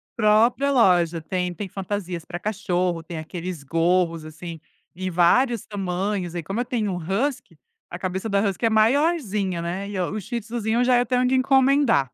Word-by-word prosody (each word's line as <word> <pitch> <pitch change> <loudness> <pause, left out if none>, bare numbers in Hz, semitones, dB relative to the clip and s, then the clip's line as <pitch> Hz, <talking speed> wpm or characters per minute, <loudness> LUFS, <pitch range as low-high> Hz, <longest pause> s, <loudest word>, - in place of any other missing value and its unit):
própria 230 +6 +3
loja 175 - +3
tem, 180 +1 -2
tem 195 +4 -6
fantasias 185 -3 -4
pra 175 0 -6
cachorro, 180 -4 -1
tem 165 0 -8
aqueles 170 0 -6
gorros, 165 +2 +1
assim, 165 +1 -8 0.4
em 185 +1 -3
vários 225 +7 +3
tamanhos, 190 -2 -3
aí 170 - -3
como 195 +8 -4
eu 245 - 0
tenho 225 -5 -1
um 180 - -3
husky, 195 - -2 0.3
a 175 - -6
cabeça 190 +4 -3
da 200 -1 +2
husky 200 +4 -2
é - - +4
maiorzinha, 220 - +1
né, 185 +4 -4
e 205 - -5
o 180 - -1
o 215 - -3
shih 240 +4 -4
tzuzinho 225 +1 -2
eu 245 - +4
já, 250 0 +4
eh, 245 - +2
tenho 250 +1 +1
que 260 - +2
encomendar. 265 - +3
195 Hz, 190 wpm, -23 LUFS, 175-235 Hz, 0.4 s, é